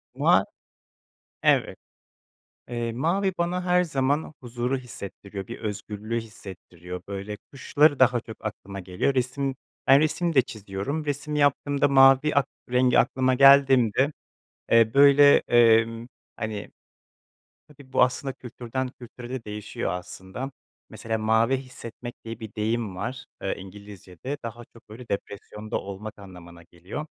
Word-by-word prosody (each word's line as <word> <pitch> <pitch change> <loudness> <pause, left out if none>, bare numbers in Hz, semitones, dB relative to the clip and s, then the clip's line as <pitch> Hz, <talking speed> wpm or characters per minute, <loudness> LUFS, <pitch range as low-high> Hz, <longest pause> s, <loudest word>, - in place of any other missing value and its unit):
Ma - - +4 1.0
Evet. - - +2 0.9
Eee, 120 -1 -3
mavi 175 - 0
bana 175 +1 -1
her 180 0 +3
zaman 145 0 -1
huzuru 125 +2 -2
hissettiriyor, 100 -5 -8
bir 120 - -8
özgürlüğü 105 +2 -4
hissettiriyor, 90 -5 -10
böyle, 100 +1 -5 0.2
kuşları 145 +2 +3
daha 125 -2 +4
çok 110 -1 -12
aklıma 100 -2 -6
geliyor. 90 +9 -1
Resim 130 +2 -1 0.3
ben 135 +1 +7
resim 155 +2 0
de 130 - +6
çiziyorum, 110 +7 -5
resim 145 +1 -3
yaptığımda 145 0 +2
mavi 135 +2 +6
ak 140 -3 +3 0.2
rengi 125 0 +3
aklıma 130 +1 +2
geldiğimde, 135 -1 +5 0.6
eee, 115 -1 +5
böyle, 140 0 +7
eee, 115 -1 +6 0.5
hani, 110 -2 -5 1.0
tabii, 140 -3 -17
bu - - +3
aslında 130 +2 -1
kültürden 125 +1 -5
kültüre 120 0 -10
de 130 -2 -5
değişiyor 105 -1 -4
aslında. 95 +8 -6 0.4
Mesela 115 0 -3
mavi 110 +4 +2
hissetmek 125 -2 -9
diye 115 0 -7
bir 110 -2 -9
deyim 110 -2 -1
var, 125 +7 -5 0.2
eee, 95 - -2
İngilizcede, 100 - -9
daha 115 +1 -7
çok 115 - -19
böyle 115 +3 -11
depresyonda 105 +2 -5
olmak 100 +2 -8
anlamına 85 -3 -13
geliyor. 90 - -8
120 Hz, 130 wpm, -25 LUFS, 105-135 Hz, 1.0 s, ben